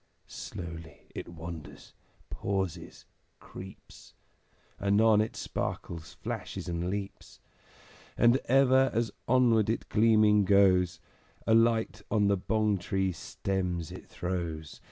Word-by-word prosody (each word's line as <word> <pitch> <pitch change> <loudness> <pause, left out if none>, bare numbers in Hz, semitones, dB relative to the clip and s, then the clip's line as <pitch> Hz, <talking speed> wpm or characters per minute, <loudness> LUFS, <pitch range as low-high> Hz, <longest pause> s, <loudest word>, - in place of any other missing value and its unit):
Slowly 85 -3 -9
it - - -6
wanders, 80 -4 -9 0.4
pauses, 95 -4 -3 0.3
creeps, 95 +1 -12 0.6
Anon 105 +2 +4
it 110 - -3
sparkles, 80 -1 -5
flashes, - - -5
and 85 0 -2
leaps; 100 0 -6 0.8
And 120 +2 +5
ever 135 0 +4
as 115 -2 0 0.2
onward 115 -4 +4
it 115 - -2
gleaming 105 -2 +4
goes 95 -3 +4 0.5
A 110 - +3
light 115 -1 +2
on 105 -1 +2
the 100 - +3
Bong 105 +1 0
tree 95 +1 -1
stems 90 -1 -3
it - - -10
throws. 85 -3 -4
100 Hz, 110 wpm, -29 LUFS, 85-110 Hz, 0.8 s, And